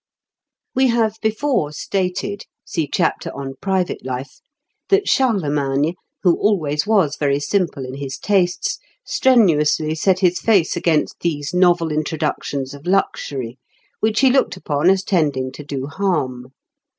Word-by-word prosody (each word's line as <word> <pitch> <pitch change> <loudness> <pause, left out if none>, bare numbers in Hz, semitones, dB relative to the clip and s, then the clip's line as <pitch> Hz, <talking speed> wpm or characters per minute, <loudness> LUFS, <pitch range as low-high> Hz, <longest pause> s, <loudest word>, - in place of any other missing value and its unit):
] - - -65
We 265 0 +3
have 225 -3 +1
before 220 - 0
stated 190 +5 -3 0.2
(see 160 -4 -2
chapter - - 0
on 135 -1 -5
Private 190 -2 -1
Life) 130 +2 -6 0.5
that 395 0 +3
Charlemagne, 150 - +1 0.3
who 175 -3 +3
always 155 -6 +1
was 190 -10 +2
very 140 -1 +1
simple 160 -3 -1
in 130 - -7
his 135 -1 -5
tastes, 185 -3 0 0.3
strenuously 160 - +3
set 185 +4 +1
his 180 -1 +3
face 200 -7 +2
against 160 -3 0
these 150 -3 -2
novel 175 -3 +3
introductions 150 -3 -2
of 145 +4 -11
luxury, 135 -10 -1 0.4
which 215 +2 +1
he 265 -2 +5
looked 265 -7 +1
upon 155 -1 +1
as 190 0 +3
tending 145 -9 0
to 150 - -9
do 140 -2 -4
harm. 140 -7 -2
165 Hz, 140 wpm, -20 LUFS, 145-195 Hz, 0.5 s, he